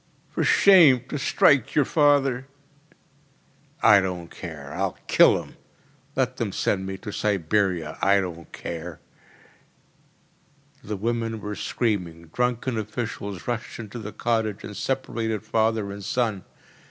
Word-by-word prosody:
“For -, -, -1 dB
shame! 160 Hz, -11 st, +6 dB
To 150 Hz, -, -3 dB
strike 135 Hz, -1 st, +3 dB
your 145 Hz, -, +4 dB
father 140 Hz, -4 st, +2 dB, 1.4 s
!‚ÄĚ -, -, +5 dB
“I 105 Hz, -2 st, +8 dB
don’t 90 Hz, -3 st, -4 dB
care, 75 Hz, -5 st, -8 dB
I’ll -, -, -2 dB
kill -, -, +5 dB
him! -, -, -17 dB, 0.6 s
Let -, -, 0 dB
them -, -, -2 dB
send 95 Hz, -1 st, -1 dB
me 95 Hz, 0 st, -5 dB
to 105 Hz, +2 st, -7 dB
Siberia, 95 Hz, -4 st, 0 dB
I 100 Hz, +1 st, +4 dB
don’t 85 Hz, -3 st, -6 dB
care!‚ÄĚ 85 Hz, +3 st, -13 dB
The 105 Hz, -1 st, -3 dB
women 115 Hz, +1 st, -2 dB
were 105 Hz, 0 st, -5 dB
screaming. 90 Hz, -8 st, -2 dB
Drunken 125 Hz, -1 st, 0 dB
officials 105 Hz, -3 st, -5 dB
rushed 120 Hz, -2 st, -3 dB
into 115 Hz, +1 st, -7 dB
the 105 Hz, -1 st, -7 dB
cottage 110 Hz, -3 st, -1 dB
and 105 Hz, -, -8 dB
separated 115 Hz, -5 st, -2 dB
father 110 Hz, -2 st, 0 dB
and 100 Hz, 0 st, -8 dB
son. 110 Hz, -2 st, -1 dB
105 Hz, 130 wpm, -25 LUFS, 95-120 Hz, 1.4 s, I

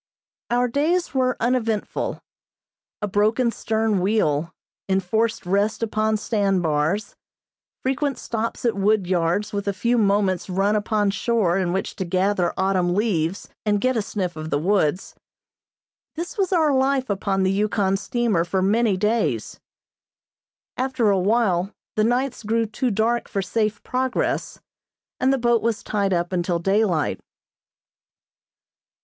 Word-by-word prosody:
Our 245 Hz, +1 st, +2 dB
days 315 Hz, +8 st, 0 dB
were 255 Hz, -2 st, +1 dB
uneventful. 230 Hz, -3 st, -1 dB, 0.8 s
A -, -, +1 dB
broken 215 Hz, +5 st, +2 dB
stern 220 Hz, -3 st, 0 dB
wheel, 170 Hz, -6 st, +1 dB, 0.4 s
enforced 195 Hz, +4 st, 0 dB
rests 200 Hz, +5 st, 0 dB
upon 215 Hz, 0 st, +1 dB
sand 200 Hz, -4 st, 0 dB
bars, 160 Hz, +7 st, 0 dB, 0.7 s
frequent 275 Hz, +1 st, 0 dB
stops 230 Hz, +1 st, -4 dB
at 235 Hz, -, +2 dB
wood 200 Hz, 0 st, +2 dB
yards 180 Hz, +3 st, 0 dB
with 200 Hz, 0 st, -3 dB
a 200 Hz, -, +1 dB
few 235 Hz, +4 st, +2 dB
moments 195 Hz, -3 st, +1 dB
run 195 Hz, +3 st, +1 dB
upon 210 Hz, -1 st, +1 dB
shore 205 Hz, -4 st, +1 dB
in 180 Hz, -2 st, 0 dB
which 190 Hz, +2 st, -2 dB
to -, -, -1 dB
gather 185 Hz, 0 st, +1 dB
autumn 185 Hz, -2 st, +1 dB
leaves, 195 Hz, -4 st, 0 dB, 0.2 s
and 205 Hz, -1 st, +1 dB
get 255 Hz, +4 st, +1 dB
a 225 Hz, -, +1 dB
sniff 190 Hz, -4 st, -3 dB
of 155 Hz, 0 st, -6 dB
the 145 Hz, -, +1 dB
woods, 180 Hz, 0 st, 0 dB, 1.0 s
this 335 Hz, +2 st, -5 dB
was 390 Hz, -3 st, 0 dB
our 315 Hz, -5 st, +3 dB
life 265 Hz, 0 st, +1 dB
upon 195 Hz, -1 st, 0 dB
the 190 Hz, -, +2 dB
Yukon 200 Hz, -1 st, +1 dB
steamer 205 Hz, -3 st, 0 dB
for 185 Hz, +2 st, -1 dB
many 210 Hz, 0 st, +2 dB
days. 195 Hz, -, -1 dB, 1.2 s
After 255 Hz, -4 st, +1 dB
a 195 Hz, -, +2 dB
while 195 Hz, -2 st, +1 dB, 0.2 s
the 215 Hz, -, +2 dB
nights 250 Hz, +3 st, 0 dB
grew 225 Hz, +1 st, 0 dB
too 235 Hz, +4 st, -2 dB
dark 230 Hz, +3 st, 0 dB
for 195 Hz, -, -2 dB
safe 215 Hz, +2 st, -1 dB
progress, 255 Hz, 0 st, -1 dB, 0.6 s
and 260 Hz, +1 st, +3 dB
the 270 Hz, -, +2 dB
boat 240 Hz, -2 st, +2 dB
was 230 Hz, -1 st, -1 dB
tied 200 Hz, -2 st, -1 dB
up 175 Hz, 0 st, 0 dB
until 175 Hz, -1 st, 0 dB
daylight. 190 Hz, -3 st, +1 dB
210 Hz, 140 wpm, -23 LUFS, 190-235 Hz, 1.2 s, our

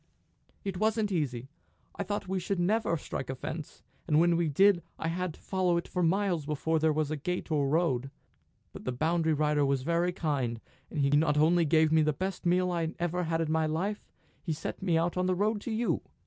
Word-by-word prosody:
"It 195 Hz, -2 st, -3 dB
wasn't 215 Hz, 0 st, +1 dB
easy. 135 Hz, -8 st, -2 dB, 0.5 s
I -, -, -4 dB
thought 205 Hz, 0 st, -3 dB
we 190 Hz, 0 st, -1 dB
should 185 Hz, +1 st, -2 dB
never 190 Hz, -1 st, +1 dB
strike 135 Hz, -, -5 dB
a 130 Hz, -, -2 dB
fence, 155 Hz, +4 st, -7 dB, 0.2 s
and 155 Hz, -2 st, +4 dB
when 170 Hz, 0 st, +4 dB
we 165 Hz, -2 st, +1 dB
did 190 Hz, +4 st, +4 dB, 0.2 s
I 160 Hz, -, -2 dB
had 180 Hz, -1 st, -3 dB
to -, -, -19 dB
follow 185 Hz, -2 st, 0 dB
it 170 Hz, -, -3 dB
for 180 Hz, -, -2 dB
miles 175 Hz, -3 st, +1 dB
before 160 Hz, +2 st, 0 dB
there 160 Hz, 0 st, +3 dB
was 155 Hz, -1 st, -1 dB
a -, -, 0 dB
gate 180 Hz, +4 st, -4 dB
or 145 Hz, -2 st, +2 dB
a -, -, 0 dB
road. 135 Hz, -5 st, +1 dB, 0.6 s
But -, -, -10 dB
the 130 Hz, -, -1 dB
boundary 160 Hz, +4 st, +1 dB
rider 150 Hz, -1 st, +2 dB
was 135 Hz, -2 st, +1 dB
very 170 Hz, +3 st, +1 dB
kind; 135 Hz, -9 st, -2 dB, 0.3 s
he 140 Hz, -3 st, 0 dB
not 150 Hz, 0 st, +3 dB
only 165 Hz, +3 st, +4 dB
gave 155 Hz, 0 st, +3 dB
me 160 Hz, 0 st, +5 dB
the 155 Hz, 0 st, +2 dB
best 185 Hz, +3 st, -3 dB
meal 180 Hz, +1 st, +2 dB
I 165 Hz, -2 st, -2 dB
ever 175 Hz, +1 st, -1 dB
had 165 Hz, 0 st, 0 dB
in 160 Hz, -1 st, -1 dB
my 160 Hz, 0 st, +2 dB
life; 190 Hz, +7 st, -2 dB, 0.4 s
he 165 Hz, -, -2 dB
set 150 Hz, -, -6 dB
me 175 Hz, -4 st, +2 dB
on 175 Hz, +2 st, 0 dB
the 185 Hz, -, +2 dB
road 205 Hz, +2 st, 0 dB
to 235 Hz, -, -5 dB
you." 230 Hz, +2 st, 0 dB
165 Hz, 220 wpm, -30 LUFS, 150-180 Hz, 0.6 s, me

